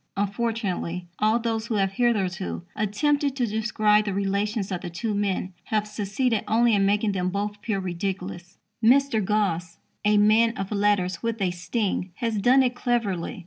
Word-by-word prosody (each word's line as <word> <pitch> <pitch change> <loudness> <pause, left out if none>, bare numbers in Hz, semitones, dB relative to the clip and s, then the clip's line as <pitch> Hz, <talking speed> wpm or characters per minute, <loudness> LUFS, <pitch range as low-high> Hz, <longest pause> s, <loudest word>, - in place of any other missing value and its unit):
Unfortunately, 200 -4 -2
all 215 +2 +3
those 225 -1 -2
who 230 - -1
have 195 -2 +1
hitherto 195 -5 -1
attempted 280 +7 0
to 255 -3 +1
describe 215 -1 +2
the 200 -2 -2
relations 200 +1 -1
of 180 -1 -3
the - - -5
two 210 +6 -3
men 195 -2 -1
have 215 -1 0
succeeded 210 +3 -1
only 235 +1 +3
in 195 -1 +3
making 205 +1 +2
them 185 -2 -1
both 205 +2 -3
appear 205 -1 -2
ridiculous. 180 0 -5 0.3
Mr. 250 -2 +4
Gosse, 185 -4 -1 0.3
a 210 0 +4
man 220 +2 +4
of 195 +1 -4
letters 200 -3 +1
with 230 -1 -2
a 190 -3 +1
sting, 185 +1 -2
has 225 -1 -1
done 255 +6 +5
it 250 -1 +1
cleverly. 230 -5 -1
210 Hz, 165 wpm, -25 LUFS, 195-225 Hz, 0.3 s, done